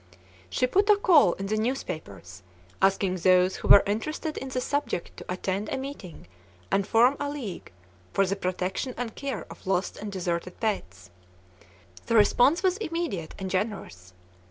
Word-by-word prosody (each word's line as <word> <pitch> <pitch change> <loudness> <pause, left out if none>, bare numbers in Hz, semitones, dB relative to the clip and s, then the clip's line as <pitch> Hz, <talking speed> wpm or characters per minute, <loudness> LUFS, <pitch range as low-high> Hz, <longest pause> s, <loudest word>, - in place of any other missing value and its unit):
She 255 - +1
put 395 +11 +2
a 420 - +8
call 320 - +5
in 195 - -6
the 215 +2 -1
newspapers, 155 - -4 0.4
asking 195 -1 +2
those 185 +1 +3
who - - -5
were 200 - +9
interested 305 - -3
in 270 - -5
the 255 - -2
subject 285 -8 -2
to - - -8
attend 190 +3 -2
a - - -2
meeting 265 - -8 0.5
and 195 0 +1
form 240 +5 +4
a 285 - -2
league 255 - -6 0.4
for 195 - +2
the 195 +1 -1
protection 185 +6 -3
and 235 -2 -4
care 280 -1 -4
of - - -13
lost 190 +1 -1
or - - -6
deserted 180 -3 -3
pets. 95 - -3 1.0
The 230 - +1
response 245 - +4
was 375 0 +2
immediate 330 - -3
and 190 -1 -5
generous. 185 - -4
200 Hz, 160 wpm, -27 LUFS, 185-270 Hz, 1.0 s, were